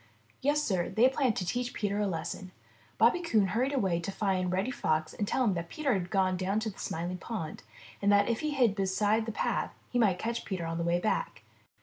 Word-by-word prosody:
Yes, 295 +2 +2
Sir, 185 -9 0
they 235 +3 +5
planned 260 -4 +1
to 185 - -2
teach 245 +5 -2
Peter 205 -1 -1
a 210 - +1
lesson. 185 +1 -4 0.5
Bobby 350 - +4
Coon 220 - +2
hurried 245 +7 +1
away 190 -11 +1
to 175 +3 -4
find 190 -3 0
Reddy 190 +7 0
Fox 155 -9 0
and 205 - -2
tell 260 - +1
him 215 -5 +3
that 170 -1 -4
Peter 295 -4 0
had 180 -3 -2
gone 185 -1 +2
down 190 +3 0
to 220 -1 -2
the - - -17
Smiling 175 +3 -3
Pool, 180 -7 -5 0.4
and 200 0 +3
that 205 0 +5
if 230 -1 0
he 305 - -1
hid 255 -8 +3
beside 205 +3 +1
the - - -1
path, - - -1 0.2
he 245 - +1
might 200 -6 +3
catch 230 +4 -3
Peter 185 -4 -3
on 165 0 -3
the - - 0
way 170 +1 +2
back. 220 - -1
200 Hz, 230 wpm, -30 LUFS, 185-235 Hz, 0.5 s, they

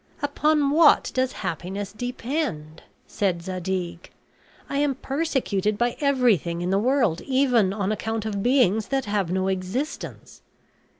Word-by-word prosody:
"Upon 290 0 +2
what 310 +1 +5
does 260 0 +1
happiness 190 +5 -4
depend?" 240 - -4 0.2
said 180 -4 -1
Zadig. 180 -1 -4 0.6
"I 280 - -2
am 285 -2 +1
persecuted 265 - -1
by 240 +1 0
everything 230 - +2
in 180 - -1
the 195 - +3
world, 240 - +1
even 255 -7 +2
on 200 0 -1
account 220 +1 -3
of 205 -2 -2
beings 220 -4 +3
that 270 -1 -1
have 205 -4 -1
no 190 +1 0
existence." 190 +10 -4
215 Hz, 130 wpm, -24 LUFS, 190-270 Hz, 0.6 s, what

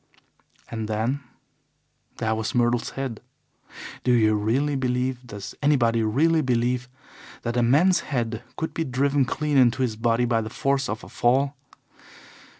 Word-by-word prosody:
"And 110 -2 -3
then 110 +6 -1 1.0
there 110 0 0
was 110 +2 -3
Myrtle's 120 -1 +2
head. 130 -5 -4 0.8
Do 125 - +2
you 110 -3 +4
really 125 +8 +1
believe 125 -1 -1
does 105 -3 -8
anybody 120 -6 +3
really 155 +9 +2
believe 125 -1 0 0.5
that 120 0 -2
a 120 - +2
man's 150 +10 +4
head 115 -4 -3 0.2
could 160 - -3
be 165 - -1
driven 135 +1 +1
clean 150 +2 -1
into 125 0 +4
his 115 -4 -1
body 115 +2 +1
by 115 -2 +1
the 110 - -5
force 140 +1 0
of 105 +1 -4
a - - -10
fall? 135 +4 +1
125 Hz, 150 wpm, -24 LUFS, 115-140 Hz, 1.0 s, you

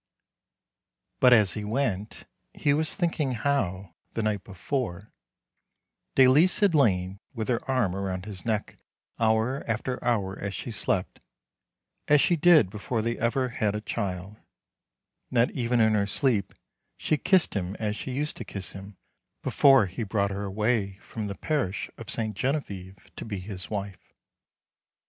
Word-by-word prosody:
But 125 - +6
as 105 -6 +5
he 105 - -4
went 105 -2 -2 0.3
he 145 - +2
was 155 +1 +1
thinking 160 -6 0
how, 100 -8 -1 0.2
the 115 - -2
night 105 -3 -1
before, 100 0 -4 1.0
Dalice 135 +7 +6
had 200 -4 +3
lain 95 - +2 0.2
with 110 0 -3
her 120 -1 0
arm 125 -9 +2
round 95 -1 -3
his 100 -4 -7
neck 110 -2 -2 0.4
hour 115 +4 +1
after 120 +3 -2
hour 100 -5 0
as 100 -1 -4
she 120 - -5
slept, 95 -3 -1 0.9
as 150 0 +6
she 175 - +3
did 160 - +5
before 110 +2 -2
they 115 +1 -1
ever 125 +2 +1
had 105 -3 -1
a - - -1
child; 100 -2 -4 0.9
and 125 - -2
that 115 +1 +4
even 120 -1 0
in 110 -1 +4
her 100 -1 +2
sleep, 110 -2 0 0.4
she - - +1
kissed 185 +2 +3
him 95 -1 -3
as 105 -1 -2
she 130 - -6
used 145 +4 -2
to - - -5
kiss 95 -3 -6
him 100 0 -10 0.5
before 135 -6 +5
he 90 +5 -6
brought 100 -2 0
her 100 +1 -3
away 105 0 0
from 110 0 -6
the 100 - -5
parish 130 - -2
of - - -9
Ste. 110 -1 -2
Genevieve 100 -6 -3 0.2
to - - -6
be 105 -3 -4
his 95 -1 -7
wife. 100 -2 -6
110 Hz, 155 wpm, -27 LUFS, 100-130 Hz, 1.0 s, But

